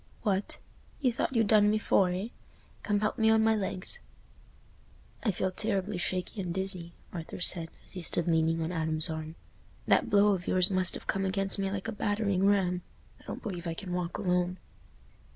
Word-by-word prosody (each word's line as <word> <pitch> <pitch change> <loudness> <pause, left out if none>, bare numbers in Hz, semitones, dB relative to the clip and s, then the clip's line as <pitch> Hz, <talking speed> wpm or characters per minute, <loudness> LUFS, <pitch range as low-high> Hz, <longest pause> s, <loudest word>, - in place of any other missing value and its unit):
"What! 200 -2 -1 0.4
You 255 -4 +1
thought 245 - -2
you'd 225 -1 +4
done 210 0 +4
for 195 -3 +3
me, 180 +3 -2
eh? - - -5 0.5
Come 205 0 0
help 215 - -1
me 220 0 +4
on 220 0 +4
my 225 0 +4
legs." 195 - 0 1.2
"I 230 - 0
feel 190 -1 -1
terribly 200 -1 -2
shaky 185 +3 -2
and 180 -2 -4
dizzy," 185 -2 -1 0.2
Arthur 165 -3 -6
said, 170 -2 +3 0.2
as - - -6
he 185 - -6
stood 170 0 -1
leaning 165 0 +2
on 160 - -3
Adam's 160 -2 0
arm; 160 0 -6 0.5
"that - - +3
blow 205 0 +5
of 185 -3 -1
yours 185 +1 +4
must 185 -1 +4
have - - -7
come 195 - -1
against 195 +1 0
me 195 0 0
like 195 +1 -4
a - - -2
battering 205 -2 0
ram. 180 -3 +2 0.4
I - - -21
don't - - -7
believe 180 -4 -5
I 165 - -3
can 180 0 -6
walk 180 -1 -2
alone." 180 -2 0
190 Hz, 190 wpm, -30 LUFS, 175-205 Hz, 1.2 s, blow